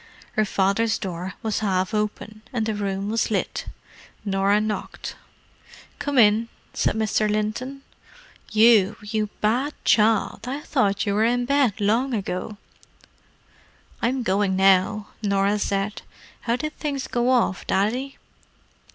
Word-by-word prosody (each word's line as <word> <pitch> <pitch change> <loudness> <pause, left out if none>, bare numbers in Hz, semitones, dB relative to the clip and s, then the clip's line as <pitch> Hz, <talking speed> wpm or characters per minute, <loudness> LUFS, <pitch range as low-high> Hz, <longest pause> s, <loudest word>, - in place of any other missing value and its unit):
Her 215 - +1
father's 200 +3 +1
door 185 -1 -5
was 220 -2 0
half 190 -1 0
open, 215 0 -3
and 235 -4 -1
the 220 - -1
room 200 -1 -2
was 225 0 +1
lit. 210 - -2 0.6
Norah 195 +1 +2
knocked. 215 0 -4 0.8
"Come 285 -2 -2
in," 225 0 +5 0.2
said - - +1
Mr. 215 -1 +1
Linton. 215 +6 -2 0.7
"You, 215 -2 +5
you 215 0 -1
bad 250 +8 +1
child! 220 +1 +2
I 275 +3 -3
thought 205 -10 +1
you 200 - 0
were 210 +2 +2
in 245 +2 +2
bed 270 -5 +2
long 230 +5 +1
ago." 200 +1 -4 1.4
"I'm 250 +2 0
going 195 -1 +1
now," 195 +2 +3
Norah 200 0 +1
said. 200 +1 -1 0.5
"How 235 - +4
did 305 +4 -4
things 280 -3 -2
go 240 0 0
off, 245 -7 +1
Daddy?" 245 +8 0
215 Hz, 130 wpm, -24 LUFS, 200-240 Hz, 1.4 s, in